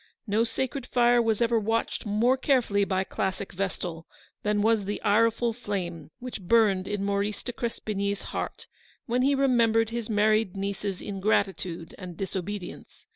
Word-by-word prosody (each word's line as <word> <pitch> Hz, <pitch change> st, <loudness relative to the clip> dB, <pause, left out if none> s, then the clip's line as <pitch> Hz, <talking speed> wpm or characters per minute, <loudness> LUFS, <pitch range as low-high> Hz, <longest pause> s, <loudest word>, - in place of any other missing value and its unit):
No 215 Hz, +1 st, +2 dB
sacred 250 Hz, +3 st, -3 dB
fire 240 Hz, -1 st, +4 dB
was 225 Hz, 0 st, +2 dB
ever 230 Hz, -1 st, +3 dB
watched 225 Hz, +1 st, -1 dB
more 225 Hz, +5 st, +3 dB
carefully 250 Hz, -7 st, +2 dB
by 190 Hz, -1 st, 0 dB
classic 190 Hz, +1 st, -3 dB
vestal 175 Hz, -3 st, -4 dB, 0.3 s
than 210 Hz, 0 st, +1 dB
was 220 Hz, -2 st, +3 dB
the 205 Hz, +1 st, -3 dB
ireful 230 Hz, +2 st, +3 dB
flame 180 Hz, -9 st, -4 dB
which 245 Hz, -4 st, -7 dB
burned 195 Hz, -1 st, +3 dB
in 205 Hz, -1 st, -2 dB
Maurice 200 Hz, +1 st, -1 dB
de 245 Hz, -, -5 dB
Crespigny's 200 Hz, -4 st, -2 dB
heart -, -, -4 dB, 0.4 s
when 245 Hz, +1 st, +1 dB
he 275 Hz, +2 st, +3 dB
remembered 230 Hz, -4 st, +3 dB
his 235 Hz, -1 st, -4 dB
married 215 Hz, -2 st, +2 dB
niece's 195 Hz, -1 st, -3 dB
ingratitude 195 Hz, -4 st, -1 dB
and 180 Hz, -3 st, -8 dB
disobedience. 195 Hz, 0 st, -6 dB
210 Hz, 145 wpm, -27 LUFS, 195-230 Hz, 0.4 s, fire